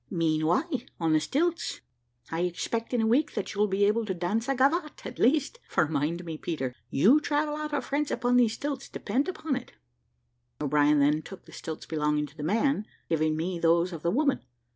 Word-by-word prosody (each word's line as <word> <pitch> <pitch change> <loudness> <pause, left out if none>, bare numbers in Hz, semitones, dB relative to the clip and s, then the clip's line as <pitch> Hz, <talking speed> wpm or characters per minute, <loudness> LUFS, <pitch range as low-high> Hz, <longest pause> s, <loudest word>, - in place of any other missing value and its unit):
"Mean 155 -2 +1
why, 175 - +3 0.4
on 165 -2 +2
the 155 - +5
stilts. 335 - -1 0.5
I 165 - -2
expect 180 +6 -2
in 245 -2 +1
a - - +2
week 265 +7 +2
that - - -3
you'll 210 +1 +2
be 200 +1 +2
able 220 +3 +2
to 190 - -1
dance 210 +8 -1
a 275 - +2
gavotte 300 +5 +1
at - - -7
least; 295 - +2
for 155 - +2
mind 160 +4 -1
me, 160 -2 -6
Peter, 135 -7 -3 0.2
you 220 - +5
travel 295 0 0
out 305 0 -4
of 285 -4 -1
France 290 +1 -1
upon 245 0 +1
these 235 -3 +4
stilts, 280 +1 -4
depend 275 +4 -1
upon 315 -6 -2
it." 255 - -7 0.9
O'Brien 150 0 +3
then 150 +2 +3
took 195 +3 -11
the - - -15
stilts 160 -2 -7
belonging 150 -1 0
to 145 +1 -15
the - - -8
man, 215 - +1 0.2
giving 155 -1 +1
me 175 +2 -2
those 170 +2 +3
of 165 - -6
the 170 - +1
woman. 275 - +2
195 Hz, 205 wpm, -28 LUFS, -, 0.9 s, the